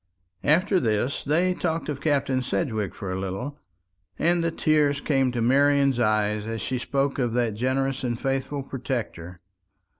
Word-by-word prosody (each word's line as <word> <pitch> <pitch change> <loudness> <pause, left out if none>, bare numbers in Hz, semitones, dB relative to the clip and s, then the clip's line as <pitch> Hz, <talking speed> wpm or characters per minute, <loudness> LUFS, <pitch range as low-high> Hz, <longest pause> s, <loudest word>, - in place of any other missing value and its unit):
After 185 +6 +3
this 115 +2 0
they 170 +6 +2
talked 165 -2 -2
of 145 -2 -4
Captain 135 -4 +1
Sedgewick 110 - -2
for 95 -2 -5
a 95 - -2
little, 110 +10 -4 0.6
and 170 +1 +2
the 165 - +2
tears 150 -3 +2
came 135 -3 +1
to 120 -2 -1
Marian's 140 +1 +3
eyes 105 -1 +1
as 115 0 -3
she 130 +2 -2
spoke 140 +2 -1
of 120 -3 0
that 120 -3 +1
generous 130 +4 -1
and 120 -2 -2
faithful 135 +1 -2
protector. 120 -10 -5
135 Hz, 155 wpm, -25 LUFS, 115-145 Hz, 0.6 s, After